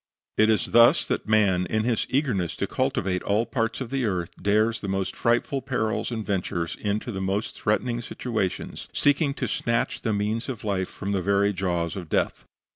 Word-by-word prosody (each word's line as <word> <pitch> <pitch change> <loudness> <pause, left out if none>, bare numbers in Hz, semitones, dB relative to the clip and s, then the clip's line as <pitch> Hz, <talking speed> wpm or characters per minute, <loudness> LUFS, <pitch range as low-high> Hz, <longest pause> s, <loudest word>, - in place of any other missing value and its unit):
It 110 +1 +6
is 110 - +1
thus 120 0 +6
that - - -2
man, 95 -5 +3
in 110 +4 0
his 115 -1 0
eagerness 125 - 0
to - - -1
cultivate 90 -1 -1
all 100 - 0
available 115 - +2
parts 115 0 -1
of 125 -2 -5
the 135 -2 0
earth, 90 -5 -1
dares 110 +3 +2
the 100 - -4
most 95 -1 -2
frightful 120 +4 +1
perils 125 -5 -1
and 110 -3 -4
ventures 85 -4 -2
into 105 +4 -1
the 95 -3 -4
most 95 +3 -1
threatening 120 +3 0
situations, 110 -5 -3
seeking 145 0 +2
to 130 - -2
snatch 115 +2 -1
the 110 - 0
means 105 +4 -1
of 120 -5 -5
life 95 -3 -1
from 100 - -5
the 100 -2 +1
very 100 +2 +2
jaws 90 -3 -1
of 90 -5 -6
death. - - 0
105 Hz, 195 wpm, -25 LUFS, 95-115 Hz, -, It